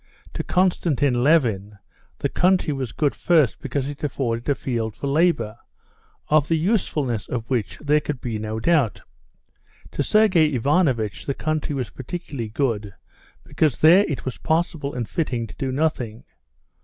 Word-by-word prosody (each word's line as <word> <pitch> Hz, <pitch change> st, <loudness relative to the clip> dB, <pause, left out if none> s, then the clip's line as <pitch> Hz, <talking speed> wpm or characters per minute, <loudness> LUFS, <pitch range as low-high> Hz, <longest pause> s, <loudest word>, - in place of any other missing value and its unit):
To -, -, -3 dB
Konstantin 150 Hz, -8 st, +1 dB
Levin 110 Hz, -10 st, +2 dB, 0.4 s
the -, -, -1 dB
country 180 Hz, -4 st, +2 dB
was 130 Hz, -4 st, -4 dB
good 145 Hz, -3 st, 0 dB
first 155 Hz, -9 st, +2 dB
because 140 Hz, 0 st, -2 dB
it 145 Hz, +1 st, -7 dB
afforded 120 Hz, -4 st, -2 dB
a 140 Hz, -, +3 dB
field 115 Hz, -5 st, -3 dB
for 120 Hz, -, -6 dB
labor, 140 Hz, -7 st, +1 dB, 0.7 s
of 150 Hz, -1 st, +3 dB
the 165 Hz, -, +2 dB
usefulness 150 Hz, -, 0 dB
of 115 Hz, 0 st, -4 dB
which 120 Hz, -5 st, -1 dB
there 150 Hz, 0 st, +2 dB
could 150 Hz, -3 st, -4 dB
be 115 Hz, -4 st, -4 dB
no 110 Hz, +1 st, -4 dB
doubt. 115 Hz, -, +1 dB, 0.9 s
To -, -, -2 dB
Sergey 170 Hz, -5 st, +4 dB
Ivanovitch 125 Hz, -, +1 dB
the 140 Hz, -, -1 dB
country 155 Hz, -2 st, -2 dB
was 130 Hz, -3 st, -3 dB
particularly 135 Hz, -4 st, -6 dB
good, 105 Hz, -5 st, -2 dB, 0.5 s
because 150 Hz, -6 st, 0 dB
there 175 Hz, +6 st, +7 dB
it 145 Hz, -, -4 dB
was 130 Hz, -, -4 dB
possible 160 Hz, -3 st, -1 dB
and 120 Hz, -3 st, -3 dB
fitting 125 Hz, -8 st, -2 dB
to -, -, -12 dB
do 135 Hz, -1 st, -2 dB
nothing. 130 Hz, -6 st, -1 dB
140 Hz, 155 wpm, -23 LUFS, 115-155 Hz, 0.9 s, there